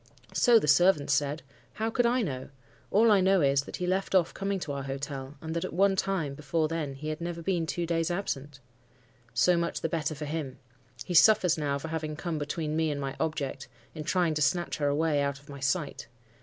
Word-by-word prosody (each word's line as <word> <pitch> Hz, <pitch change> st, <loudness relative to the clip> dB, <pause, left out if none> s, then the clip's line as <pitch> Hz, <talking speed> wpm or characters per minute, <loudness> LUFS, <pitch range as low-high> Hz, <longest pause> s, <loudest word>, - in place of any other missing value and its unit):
"'So 240 Hz, -2 st, +5 dB
the 210 Hz, -, +1 dB
servants 150 Hz, -2 st, +4 dB
said. 145 Hz, +1 st, 0 dB, 0.3 s
How 220 Hz, +1 st, -2 dB
could 240 Hz, +1 st, +2 dB
I 245 Hz, 0 st, +2 dB
know? 130 Hz, -8 st, -4 dB, 0.4 s
All 220 Hz, +2 st, +5 dB
I 200 Hz, -2 st, +5 dB
know 190 Hz, 0 st, +4 dB
is, 140 Hz, -1 st, +3 dB
that -, -, -7 dB
he 180 Hz, -, -3 dB
left 190 Hz, +2 st, 0 dB
off 175 Hz, -3 st, +3 dB
coming 195 Hz, 0 st, -2 dB
to 150 Hz, -, -4 dB
our 140 Hz, 0 st, -3 dB
hotel, 135 Hz, 0 st, -5 dB
and 160 Hz, +1 st, -5 dB
that 170 Hz, -, -1 dB
at -, -, -5 dB
one 195 Hz, +2 st, +3 dB
time 190 Hz, -7 st, -1 dB
before 150 Hz, +2 st, -1 dB
then 155 Hz, -4 st, -3 dB
he 155 Hz, +3 st, -5 dB
had 155 Hz, +2 st, -4 dB
never 170 Hz, 0 st, -4 dB
been 170 Hz, -3 st, 0 dB
two 175 Hz, +2 st, -2 dB
days 165 Hz, 0 st, 0 dB
absent.' 145 Hz, -6 st, -4 dB, 0.8 s
"'So 175 Hz, +10 st, +4 dB
much 170 Hz, 0 st, -2 dB
the 165 Hz, -, -1 dB
better 155 Hz, -1 st, -2 dB
for 150 Hz, +1 st, -5 dB
him. 145 Hz, -3 st, -4 dB, 0.5 s
He 180 Hz, -, -4 dB
suffers 180 Hz, -1 st, +6 dB
now 145 Hz, -3 st, -1 dB
for 160 Hz, +3 st, -6 dB
having 155 Hz, -1 st, -3 dB
come 160 Hz, -1 st, -3 dB
between 150 Hz, +1 st, -3 dB
me 160 Hz, 0 st, +1 dB
and 145 Hz, -1 st, -2 dB
my 135 Hz, -1 st, -4 dB
object—in 135 Hz, -2 st, -5 dB
trying 175 Hz, 0 st, +1 dB
to 150 Hz, -, -2 dB
snatch 175 Hz, +4 st, +1 dB
her 145 Hz, -, 0 dB
away 145 Hz, 0 st, +1 dB
out 140 Hz, -1 st, -1 dB
of 140 Hz, +1 st, -19 dB
my 140 Hz, -1 st, -8 dB
sight. 140 Hz, -2 st, -2 dB
155 Hz, 220 wpm, -29 LUFS, 145-180 Hz, 0.8 s, suffers